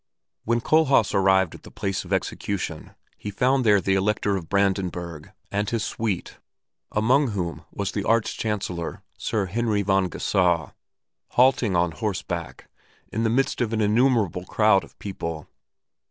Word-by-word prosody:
When 120 +1 +1
Kohlhaas 140 -7 +3
arrived 95 -2 +3
at - - -11
the - - -13
place 95 -2 -3
of 90 - -12
execution 95 -3 -3 0.2
he 105 - -5
found 130 +6 +2
there 105 -3 +5
the 95 +1 0
Elector 100 +1 +1
of 85 -4 -5
Brandenburg 90 -5 -1 0.2
and 105 0 -1
his 115 -3 -1
suite, 110 -5 -3 0.5
among 130 +7 +3
whom 90 -7 -4
was - - -3
the - - -2
Arch 115 0 +1
Chancellor, 95 -6 -3 0.2
Sir 105 -3 -1
Heinrich 105 +1 0
von 95 -1 +2
Geusau, 85 -3 +1 0.6
halting 125 -5 +4
on 85 -1 +2
horseback, 90 -2 -4 0.5
in 110 - -1
the 115 - +2
midst 130 +2 +1
of 115 -2 0
an 110 - 0
innumerable 105 -4 +2
crowd 105 -2 +3
of - - -16
people. 85 -6 -5
100 Hz, 150 wpm, -24 LUFS, 90-115 Hz, 0.6 s, there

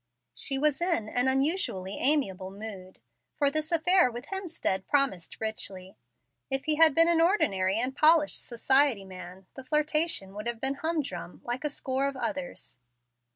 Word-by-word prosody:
She 270 - 0
was 300 +2 0
in 335 -12 0
an 245 +3 0
unusually 265 - -1
amiable 195 -11 +1
mood, 195 -2 -9 0.4
for 285 -1 +1
this 310 +2 -2
affair 355 -1 +4
with 240 +1 -8
Hemstead 335 - -3
promised 275 - -1
richly. 195 -4 -6 0.5
If 270 0 -2
he 310 - +4
had 320 -3 +6
been 330 0 +6
an 335 -1 +4
ordinary 200 - +1
and 255 +3 -2
polished 310 0 +3
society 255 -2 +2
man, 185 0 -11
the 265 - -10
flirtation 300 - +1
would 210 +3 -7
have 235 -1 -2
been 265 +2 0
humdrum, 290 - -4
like 245 +3 -4
a 300 - -1
score 270 -1 -2
of 275 -1 -5
others. 280 - -5
265 Hz, 155 wpm, -27 LUFS, 200-305 Hz, 0.5 s, had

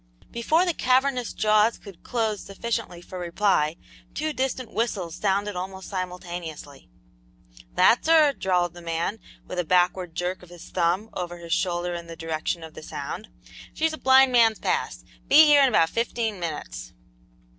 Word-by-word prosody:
Before 310 +10 +2
the 350 - 0
cavernous 255 -2 +1
jaws 215 +1 +3
could 195 -5 -13
close 220 -4 -2
sufficiently 200 -3 -4
for 185 - -8
reply, 170 -3 +1 0.4
two 310 +1 -2
distant 260 -3 -3
whistles 205 -7 -2
sounded 200 0 0
almost 190 +1 -6
simultaneously. 175 - -6 0.9
"That's 245 - +4
her," 315 -3 +6
drawled 180 -6 0
the 175 - -11
man, 170 +5 -2 0.3
with 180 - -5
a - - +1
backward 180 0 +1
jerk 180 +2 -3
of 180 - -15
his 175 -1 -12
thumb 185 +5 0
over 175 -1 -5
his 170 -1 -4
shoulder 175 -1 -1
in 170 -1 -6
the 165 - -8
direction 165 +1 -3
of 160 -1 -10
the - - -10
sound; 155 +7 -6 0.5
"she's 320 0 0
at 315 - -8
Blind 265 0 +6
Man's 225 -3 +4
Pass; - - -2 0.2
be 310 +2 +8
here 295 -1 +6
in 275 - +6
about 165 -8 +4
fifteen 230 -3 -2
minutes." 150 - -6
190 Hz, 160 wpm, -25 LUFS, 175-235 Hz, 0.9 s, be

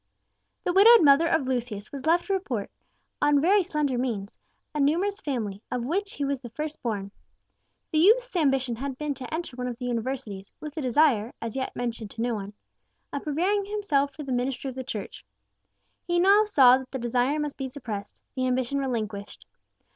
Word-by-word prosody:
The 355 - 0
widowed 435 +2 +8
mother 290 +3 +6
of 320 -5 +1
Lucius 240 -5 -3
was 275 +1 -6
left 340 +2 +3
to 395 - -1
support, 260 - -2 0.5
on 290 -1 +4
very 390 +7 +4
slender 300 -7 -1
means, 215 -6 -3 0.4
a 300 - -2
numerous 355 +9 +2
family, 215 -8 -3
of 240 -1 -2
which 395 +8 -2
he 285 - -2
was 275 -1 -2
the 240 - -8
first 305 +6 -5
born. 205 -4 -3 0.8
The 310 - +2
youth's 475 +6 +4
ambition 270 -7 +1
had 270 +1 -4
been 300 0 -2
to 265 -2 -9
enter 320 -5 -4
one 250 0 -3
of 240 -2 -5
the 250 - -6
universities, 230 -5 -4
with 300 0 -8
a 315 - -3
desire 250 -4 +2
as 230 -2 -5
yet 260 -1 -3
mentioned 235 -3 -4
to 225 - -7
no 240 0 0
one 205 -1 -5 0.6
of 285 - -2
preparing 370 +7 0
himself 350 -10 0
for 300 - -6
the 270 - -5
ministry 250 +2 -1
of - - -13
the 260 - -4
Church. 215 -5 -6 0.8
He 345 0 +1
now 400 +4 +5
saw 260 -11 +6
that 260 -1 -10
the 265 - -3
desire 245 +4 0
must 295 -1 -3
be 270 - -3
suppressed, 225 -7 -7
the 255 -1 -1
ambition 255 +2 0
relinquished. 220 -6 -4
270 Hz, 190 wpm, -26 LUFS, 240-310 Hz, 0.8 s, widowed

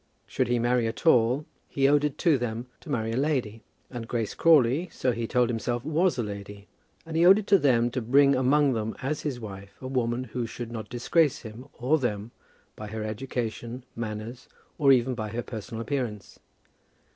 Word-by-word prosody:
Should - - -1
he 120 0 +1
marry 120 0 +1
at 115 - -6
all, 125 -1 +4 0.2
he 135 -1 +2
owed 145 +1 +4
it 150 -2 -1
to 165 -4 +3
them 120 0 -3
to 165 - -14
marry 115 -5 -1
a - - -2
lady. 130 -7 -1 0.3
And 120 -3 -6
Grace 115 -3 -2
Crawley, 155 +1 +4
so 130 - 0
he 115 -1 -3
told 125 +1 +2
himself, 120 +1 -2
was 165 +3 +1
a 120 - 0
lady. 100 -1 -8 0.4
And 165 -1 -7
he 165 - +3
owed 190 +3 +8
it 215 - -3
to 200 -2 +5
them 120 -5 +3
to 130 - -2
bring 140 +4 +4
among 135 +2 +3
them 110 -1 -3
as 150 +3 -2
his 140 -5 -3
wife 100 -3 -9
a - - -10
woman 125 -1 -1
who 125 -2 -4
should 115 +1 -7
not 110 -2 -6
disgrace 140 +5 +1
him 115 +4 -10
or 135 +6 +1
them 110 -3 -3 0.4
by 105 - -7
her 110 +1 -5
education, 120 +1 -4
manners, 115 +2 -6 0.3
or 140 -3 +5
even 130 0 +3
by 110 -3 -4
her 120 +3 -4
personal 115 0 -6
appearance. 115 -6 -4
120 Hz, 195 wpm, -27 LUFS, 115-140 Hz, 0.4 s, owed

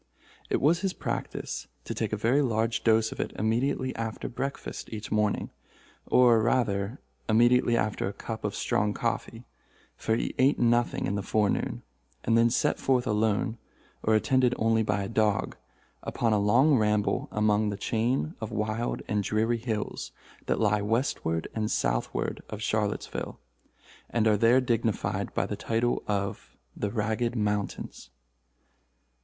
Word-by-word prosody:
It - - +1
was 160 +5 +3
his 190 +1 -1
practice - - -4 0.2
to - - -3
take - - -2
a 110 - -1
very 120 +7 +3
large 115 -3 0
dose 110 -1 +3
of - - -8
it - - -2
immediately 130 +4 0
after 115 -1 -4
breakfast 135 +3 -5
each 105 -1 -6
morning—or, 110 +2 +1
rather, 110 -1 0 0.3
immediately 120 +1 +4
after 105 -2 -1
a - - -2
cup 110 +2 -6
of 105 - -2
strong 105 0 0
coffee, 115 0 -3 0.5
for 110 - 0
he - - -2
ate 135 +3 +4
nothing 120 0 +2
in - - -1
the 100 - -1
forenoon—and 100 - -2
then 115 0 +5
set 115 - +1
forth 130 -2 +2
alone, 110 +1 0 0.4
or 110 - +3
attended 125 +2 +3
only 115 0 +2
by 105 -2 0
a - - -3
dog, 110 -3 +1 0.5
upon 115 -2 0
a 105 - +3
long 125 +7 +4
ramble 105 -1 +1
among 105 0 +2
the 100 - -3
chain 120 +9 0
of 110 - -3
wild 110 +2 -2
and 105 -1 +1
dreary 110 +4 0
hills 110 -3 -3 0.4
that - - +1
lie 105 -1 +2
westward 105 - -1
and 110 -1 -1
southward - - -1
of 105 - -6
Charlottesville, 105 -1 -2 0.7
and 115 -2 +1
are 110 -1 +5
there 115 +5 +5
dignified 115 -3 -1
by - - +1
the - - -3
title 115 +2 0
of 100 -1 -3 0.2
the 105 - -2
Ragged 110 +3 -1
Mountains. 105 -2 -2
110 Hz, 150 wpm, -28 LUFS, 105-120 Hz, 0.7 s, then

